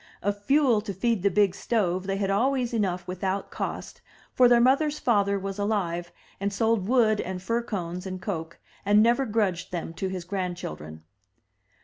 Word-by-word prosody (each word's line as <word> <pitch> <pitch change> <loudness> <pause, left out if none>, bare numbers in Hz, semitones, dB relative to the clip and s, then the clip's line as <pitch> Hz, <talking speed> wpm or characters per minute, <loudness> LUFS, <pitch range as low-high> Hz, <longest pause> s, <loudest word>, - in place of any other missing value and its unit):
Of 205 0 -1
fuel 260 -1 +3
to 205 -3 -6
feed 225 +1 0
the 200 - +3
big 200 0 +3
stove 190 -3 -1
they 195 0 -1
had 195 -1 0
always 250 +3 +1
enough 185 -5 -1
without 190 +2 -3
cost, - - -5 0.3
for 250 - +6
their 240 -1 +6
mother's 280 +5 +3
father 200 -6 +2
was 195 +1 -5
alive, 175 -5 -1 0.3
and 200 +1 -1
sold 220 -1 +1
wood 225 -3 +3
and 185 0 -5
fir 230 +6 -1
cones 180 -5 -5
and 185 0 -5
coke, 165 -4 -5 0.3
and 205 +1 +5
never 240 +3 +2
grudged 205 -5 -1
them 170 -2 -4
to 190 - -3
his 185 -2 -4
grandchildren. 175 - -5
200 Hz, 170 wpm, -26 LUFS, 185-230 Hz, 0.3 s, for